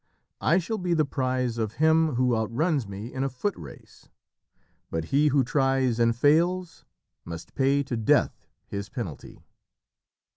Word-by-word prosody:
I 170 - +3
shall 210 +5 -2
be 180 -2 0
the 155 -2 +2
prize 130 -3 -1
of 110 -1 -2
him 160 -2 +3
who 125 -1 +2
outruns 125 - 0
me 100 +5 -7
in 130 0 -2
a 135 - 0
foot 155 +10 -3
race. - - -13 0.8
But 80 -1 -3
he 145 +2 +4
who 140 -2 +3
tries 135 -2 +1
and 115 0 +3
fails, 165 +7 +1 0.4
must 85 -1 -9
pay 140 +1 +2
to 130 -2 -4
Death 110 -2 +1 0.2
his 100 +1 -6
penalty." 95 - -7
130 Hz, 150 wpm, -26 LUFS, 115-155 Hz, 0.8 s, he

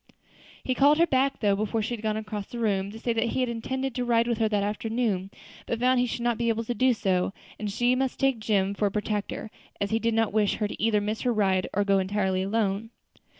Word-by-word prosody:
He 255 - 0
called 285 +3 +5
her 335 - +5
back 270 -2 +1
though, 205 -2 +3
before 215 +2 -1
she 240 - -2
had 230 - -5
gone 215 -1 -1
across 215 -2 -5
the 240 - -8
room, 200 -4 0
to 215 - -9
say 235 +1 -1
that 230 - +1
he 260 - 0
had 250 - 0
intended 260 +3 -3
to 250 - -2
ride 235 -1 +2
with 235 -2 0
her 220 -1 +2
that 205 -2 +1
afternoon, 210 -2 -1 0.4
but 230 - -2
found 255 +1 +3
he 250 - +2
should 235 0 -4
not 240 -1 0
be 235 -1 +1
able 230 0 0
to 240 - -2
do 255 +3 +3
so, 190 -2 0 0.3
and 210 -1 -3
she 240 +4 +2
must 260 0 -1
take 270 -4 +2
Jim 200 -3 +1
for 205 +1 +1
a - - -3
protector, 210 +1 -3 0.3
as 200 - -1
he 225 - +2
did 230 0 0
not 225 -2 +1
wish 210 -2 +2
her 215 - -1
either 215 -1 +2
to 205 - -4
miss 215 +1 -2
her 250 - +1
ride 190 -4 +1
or 205 - +1
to - - -10
go 195 -1 +4
entirely 190 -1 0
alone. 200 +1 -1
220 Hz, 260 wpm, -27 LUFS, 205-240 Hz, 0.4 s, called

